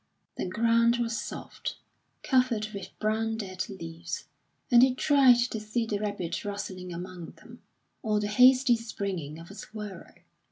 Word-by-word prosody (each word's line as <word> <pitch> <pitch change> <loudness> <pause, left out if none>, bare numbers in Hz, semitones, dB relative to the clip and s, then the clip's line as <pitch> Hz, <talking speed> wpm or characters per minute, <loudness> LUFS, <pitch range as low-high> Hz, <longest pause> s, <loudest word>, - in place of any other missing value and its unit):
The - - -3
ground 230 +4 +3
was 235 -1 -1
soft, 210 - -6 0.5
covered 250 -5 +2
with 200 -2 -6
brown 220 +1 0
dead 185 -1 -4
leaves, 170 -3 -6 0.5
and 240 -1 +8
he 255 0 +5
tried 270 -3 +6 0.2
to 220 - -3
see 215 +2 -2
the 210 -2 -2
rabbit 205 -5 -3
rustling 190 -3 -5
among 175 0 -7
them, - - -15 0.4
or 215 -2 +1
the 210 - -1
hasty 250 +4 +6
springing 195 -9 -4
of 165 +3 -11
a - - -9
squirrel. 210 -3 -9
210 Hz, 150 wpm, -28 LUFS, 185-235 Hz, 0.5 s, and